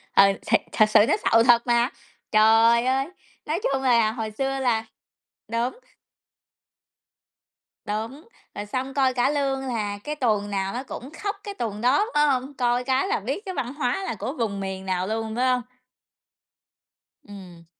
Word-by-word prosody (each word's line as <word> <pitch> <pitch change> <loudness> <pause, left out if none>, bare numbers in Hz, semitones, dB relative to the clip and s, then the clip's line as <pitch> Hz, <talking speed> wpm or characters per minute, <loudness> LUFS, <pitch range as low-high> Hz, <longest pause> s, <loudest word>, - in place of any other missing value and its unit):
Ừ, 195 - +8 0.2
thiệt, - - +3
thật 215 - +4
sự - - +6
nó - - +3 0.2
sầu 230 0 +6
thật 240 0 +4
mà. 240 +2 +3 0.4
Trời 225 +2 +5
ơi! 265 +2 +1 0.4
Nói 315 +4 -1
chung 270 - 0
là 235 -4 +3
hồi 220 -2 -4
xưa 270 +4 -2
là 230 -4 +1 0.7
đúng. 240 - -1 2.1
Đúng, 225 - -5 0.3
rồi 205 - -5
xong 260 +5 -4
coi 265 -2 +2
cả 250 +2 +2
lương 275 -2 0
là 210 -4 -2
cái 300 0 -4
tuồng 215 -6 0
nào 195 0 -2
nó 250 +2 -4
cũng 265 +1 -8
khóc 410 0 -1
cái 405 - -6
tuồng 215 - -4
đó, 270 - +3
phải 295 0 +4
hông? 265 +1 -1
Coi 245 -1 0
cái 265 +7 +1
là 410 - 0
biết 275 - -4
cái 375 - -4
văn 250 +2 -3
hóa 290 +6 -1
là 230 - -3
của 260 +7 -4
vùng 215 -8 -2
miền 190 0 -5
nào 185 0 -1
luôn, 220 0 -3
phải 250 +1 +1
hông? 250 -1 +2 1.6
Ừm. 185 -5 -12
240 Hz, 170 wpm, -24 LUFS, 215-270 Hz, 2.1 s, Ừ